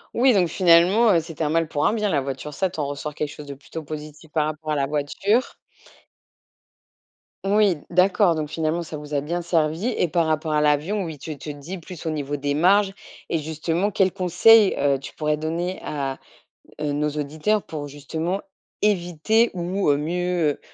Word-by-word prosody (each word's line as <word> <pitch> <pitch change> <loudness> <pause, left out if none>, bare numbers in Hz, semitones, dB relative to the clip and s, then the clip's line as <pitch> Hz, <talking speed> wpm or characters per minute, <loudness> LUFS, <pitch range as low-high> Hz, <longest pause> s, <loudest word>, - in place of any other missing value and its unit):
Oui 255 +1 +5
donc 180 -4 +3
finalement, 185 +6 +5
heu, 170 - +4
c'était 165 0 -5
un 150 - 0
mal 165 -1 +2
pour 145 -1 -1
un - - +3
bien 210 -2 0
la 145 - +2
voiture. 135 +2 -5
Ça, 185 +5 -1
tu 160 - -8
en 145 - -1
ressors 145 +1 -5
quelque 150 0 -3
chose 150 0 -10
de 140 - -7
plutôt 155 +3 -9
positif 155 +1 -9
par 155 -1 +1
rapport 155 0 -4
à - - +1
la 140 -1 0
voiture. 155 - 0 1.9
Oui, 200 -4 +3
d'accord 180 0 +3
donc 150 -1 -3
finalement, 160 +2 -1
ça 155 -1 -7
vous 150 0 -9
a 140 - +1
bien 170 +4 -3
servi 165 +4 0
et 175 - +1
par 170 +1 +2
rapport 155 0 -1
à 150 - +2
l'avion, 150 +8 +1
oui, 160 -3 -6
tu 155 +1 -7
te 150 - -8
dis 145 +6 -7
plus 175 0 -10
au - - 0
niveau 145 -2 -3
des 145 0 -1
marges 195 +6 +4 0.4
et 165 - 0
justement 160 +5 -1
quels 190 -2 +2
conseils, 190 +4 +5
heu, 140 -1 +2
tu - - -9
pourrais 150 -1 0
donner 170 +4 -3
à, 135 -3 -4 0.6
heu, 150 -1 -1
nos 150 +1 0
auditeurs 155 +8 -1
pour 150 -2 -6
justement 160 +7 -3 0.4
éviter 205 +3 +2
ou 175 -1 -3 0.3
mieux 170 -1 -1
160 Hz, 190 wpm, -23 LUFS, 150-180 Hz, 1.9 s, Oui